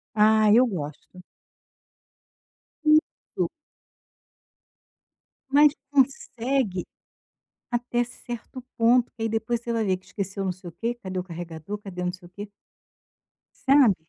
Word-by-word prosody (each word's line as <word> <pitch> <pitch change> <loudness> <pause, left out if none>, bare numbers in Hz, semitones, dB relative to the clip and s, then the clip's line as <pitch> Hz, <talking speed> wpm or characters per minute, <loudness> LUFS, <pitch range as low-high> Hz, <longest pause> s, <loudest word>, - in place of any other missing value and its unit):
Ah, 215 0 +5
eu 250 +3 +7
gosto. 180 0 -7 1.6
Isso. 310 0 +2 2.0
Mas 295 +1 +6 0.2
consegue 260 -6 +1 0.9
até 240 0 0
certo 240 +1 -8 0.2
ponto, 235 +1 +4
que 225 - -11
aí 225 - +1
depois 225 +1 -1
você 235 0 -4
vai 225 -1 0
ver 190 -2 +2
que 185 - -25
esqueceu 195 -1 -4
não 185 - 0
sei 180 0 -9
o - - -12
quê, 235 +1 -2
cadê 190 -5 -6
o 180 - -3
carregador, 170 +2 -6
cadê 195 -4 -7
o - - -1
não 180 - 0
sei 180 -1 -11
o 175 - -23
quê. 205 +2 -8 1.2
Sabe. 270 -7 +7
220 Hz, 130 wpm, -26 LUFS, 185-240 Hz, 2.0 s, eu